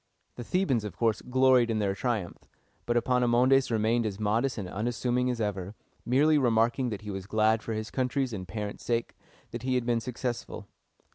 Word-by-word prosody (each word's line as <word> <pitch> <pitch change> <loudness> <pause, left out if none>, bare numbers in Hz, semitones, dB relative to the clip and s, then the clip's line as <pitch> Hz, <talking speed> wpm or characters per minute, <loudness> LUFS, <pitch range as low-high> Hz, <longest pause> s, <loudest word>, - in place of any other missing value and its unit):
The 120 - -7
Thebans, 135 - 0
of 100 -5 -7
course, 115 -2 +1
gloried 130 -1 +3
in 110 - 0
their 100 -2 0
triumph; 105 -3 -3 0.4
but 120 0 +2
Epaminondas 125 +2 +3
remained 115 +1 +1
as 100 -1 -5
modest 115 +5 0
and 100 -4 -4
unassuming 120 +5 -1
as 125 -2 -2
ever, 100 -2 -3 0.3
merely 145 +5 +4
remarking 120 +1 +2
that 105 -3 -5
he 105 -1 -6
was 95 0 -6
glad 110 +1 +2
for 115 - -4
his 110 +1 -4
country's 130 -1 -1
and 95 -3 -6
parents' 105 +2 -5
sake 115 -1 -1 0.4
that 120 - -5
he 130 +1 0
had 125 -2 0
been 120 -1 +1
successful. 125 0 -5
115 Hz, 185 wpm, -28 LUFS, 110-125 Hz, 0.4 s, merely